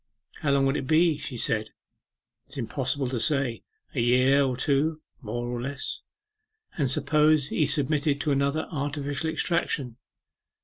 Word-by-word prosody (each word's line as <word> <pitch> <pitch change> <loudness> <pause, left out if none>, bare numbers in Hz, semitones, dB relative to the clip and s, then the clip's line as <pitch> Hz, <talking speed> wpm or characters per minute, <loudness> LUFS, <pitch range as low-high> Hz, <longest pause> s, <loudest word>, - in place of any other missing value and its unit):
'How 150 - -1
long 140 -1 +3
would 135 +1 +1
it 130 - -4
be?' 160 0 +3
she 140 -4 -5
said. 110 -1 +1 0.8
'It 135 - -15
is - - -6
impossible 130 +2 -1
to 125 -2 -2
say. 135 -3 0 0.3
A 135 - -2
year 130 +4 +4
or 130 -2 -1
two, 150 +4 +1 0.2
more 120 +1 -4
or 120 0 -3
less.' 140 +3 -4 0.7
'And 140 -5 +1
suppose 150 +1 +3
he 155 - +1
submitted 145 0 +1
to 150 - 0
another 140 +3 0
artificial 145 0 -2
extraction? 155 -7 -1
140 Hz, 150 wpm, -26 LUFS, 130-150 Hz, 0.8 s, year